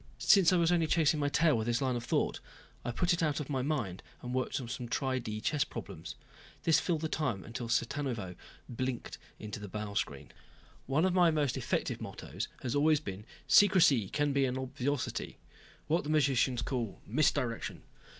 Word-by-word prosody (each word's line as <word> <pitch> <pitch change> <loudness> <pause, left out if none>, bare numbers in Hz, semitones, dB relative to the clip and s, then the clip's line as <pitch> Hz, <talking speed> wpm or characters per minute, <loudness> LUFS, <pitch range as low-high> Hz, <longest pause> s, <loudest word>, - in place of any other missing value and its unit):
Since 190 -5 +5
I 180 - +4
was 170 0 +3
only 170 -2 +2
chasing 155 -1 +3
my 145 -1 +1
tail 155 0 +3
with 110 0 -1
this 120 0 +1
line 130 -2 0
of 120 - -3
thought, 120 - 0 0.4
I - - -3
put 175 +9 +1
it 175 - -1
out 155 -2 +1
of 150 -1 -5
my 135 -2 0
mind 125 - -2 0.2
and 125 0 -4
worked 130 +1 -1
on 125 - -6
some 125 0 -5
tri 130 0 0
di 110 -3 -5
chess 145 +5 +1
problems. - - -8 0.5
This 165 - +4
filled 165 -4 -1
the 160 - -1
time 135 -11 -2
until 115 +1 -6
Cittanuvo 120 -5 -1 0.3
blinked 130 +1 -4 0.2
into 105 +1 -7
the 105 - -7
bow 105 +1 -5
screen. - - -3 0.6
One 145 +6 +2
of 190 - +2
my 180 -2 +5
most 150 -5 +1
effective - - -2
mottoes - - -5 0.2
has 125 -2 -2
always 150 +1 +4
been, 105 -7 -7 0.2
"Secrecy 165 - +5
can 145 -1 0
be 140 -1 +3
an 130 0 -2
obviousity." 130 +1 -3 0.5
What 165 +3 +1
the 145 - -6
magicians 135 -5 +2
call 120 -6 -3
misdirection. 120 -2 0
135 Hz, 190 wpm, -32 LUFS, 120-155 Hz, 0.6 s, Since